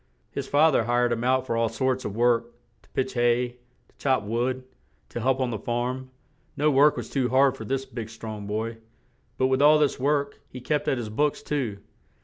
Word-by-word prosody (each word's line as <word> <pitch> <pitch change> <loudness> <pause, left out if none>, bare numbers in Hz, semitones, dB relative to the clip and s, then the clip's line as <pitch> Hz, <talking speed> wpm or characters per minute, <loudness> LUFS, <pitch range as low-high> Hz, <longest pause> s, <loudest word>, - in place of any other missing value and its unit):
His 140 -1 -4
fa 155 +3 +5
ther 120 -5 +2
hired 120 +1 +2
him 120 0 -1
out 130 +1 +2
for 115 - -1
all 115 0 +1
sorts 130 +1 -1
of 100 - -4
work; 120 0 +2 0.3
to - - -27
pitch 130 0 -2
hay, 120 0 +1 0.3
to - - -31
chop 130 -5 +1
wood, 120 +5 -1 0.5
to - - -5
help 130 +2 +1
on 130 -2 0
the 110 - -3
farm; 125 +4 -2 0.5
no 150 +1 +3
work 145 +2 +5
was - - -4
too 130 -3 0
hard 135 +1 +4
for - - -8
this 135 0 -2
big, 115 -4 -7
strong 110 -2 -7
boy; 110 +2 -3 0.6
but, 130 - +2
with 130 +1 +2
all 150 +1 +7
this 150 -2 +1
work, 140 +1 0
he 125 - -8
kept 145 +4 -1
at 135 - +2
his 115 -3 -4
books 145 +7 0
too. 130 -10 -2
130 Hz, 210 wpm, -26 LUFS, 120-135 Hz, 0.6 s, all